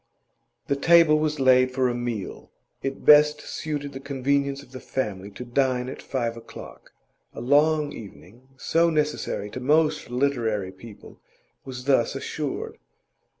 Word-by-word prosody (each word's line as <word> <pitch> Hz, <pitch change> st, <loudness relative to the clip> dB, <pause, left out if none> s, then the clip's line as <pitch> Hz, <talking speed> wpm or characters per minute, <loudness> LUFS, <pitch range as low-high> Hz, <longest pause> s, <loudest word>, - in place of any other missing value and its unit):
The 140 Hz, -, 0 dB
table 165 Hz, +1 st, +5 dB
was 155 Hz, -1 st, -1 dB
laid 130 Hz, -1 st, +5 dB
for 130 Hz, -1 st, +2 dB
a 120 Hz, -, -1 dB
meal. 120 Hz, -4 st, -5 dB, 0.3 s
It 135 Hz, 0 st, -5 dB
best 150 Hz, 0 st, +6 dB
suited 145 Hz, -2 st, -5 dB
the 135 Hz, -, -7 dB
convenience 140 Hz, 0 st, -1 dB
of 125 Hz, -, -20 dB
the 130 Hz, -, -8 dB
family 105 Hz, -8 st, -4 dB
to 105 Hz, +5 st, -9 dB
dine 125 Hz, 0 st, 0 dB
at -, -, -8 dB
five 120 Hz, -4 st, -3 dB
o'clock; 115 Hz, 0 st, -12 dB, 0.4 s
a -, -, -6 dB
long 145 Hz, +4 st, +2 dB
evening, 115 Hz, +3 st, -13 dB
so 170 Hz, +5 st, +2 dB
necessary 150 Hz, -9 st, -2 dB
to 125 Hz, -, -6 dB
most 150 Hz, +2 st, +1 dB
literary 120 Hz, -7 st, -1 dB
people, 100 Hz, +3 st, -14 dB, 0.5 s
was 125 Hz, -2 st, -8 dB
thus 135 Hz, -3 st, +2 dB
assured. 145 Hz, +1 st, -5 dB
135 Hz, 145 wpm, -25 LUFS, 120-150 Hz, 0.5 s, best